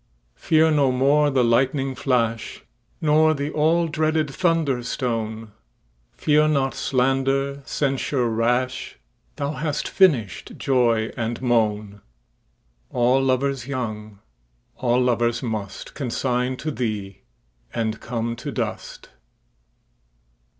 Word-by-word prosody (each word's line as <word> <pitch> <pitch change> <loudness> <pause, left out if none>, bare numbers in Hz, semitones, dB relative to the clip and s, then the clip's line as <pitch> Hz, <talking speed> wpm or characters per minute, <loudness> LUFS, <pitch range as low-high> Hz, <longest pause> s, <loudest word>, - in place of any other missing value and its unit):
Fear 160 - +3
no 140 -3 +3
more 140 +3 +3
the 130 -3 +2
lightning 135 +3 +1
flash, 115 -3 -1 0.4
Nor 155 +1 +4
the 140 +1 -3
all 165 +3 +2
dreaded 155 -1 0
thunder 160 -6 +1
stone; 115 -3 -3 0.6
Fear 150 0 +3
not 140 -3 +1
slander, 135 +2 0
censure 135 -2 0
rash; 120 +3 -1 0.4
Thou 140 - -2
hast 150 +1 -2
finish'd 130 - +1
joy 115 -4 +1
and 115 -1 -3
moan:All 105 - -2
lovers 135 -1 0
young, 110 -6 -5 0.6
all 125 0 +1
lovers 120 -1 +1
mustConsign 125 +3 -3
to 155 +3 -3
thee, 105 -7 -4 0.5
and 110 -1 -2
come 115 -1 -3
to - - -5
dust. - - -5
125 Hz, 100 wpm, -23 LUFS, 115-140 Hz, 0.6 s, Nor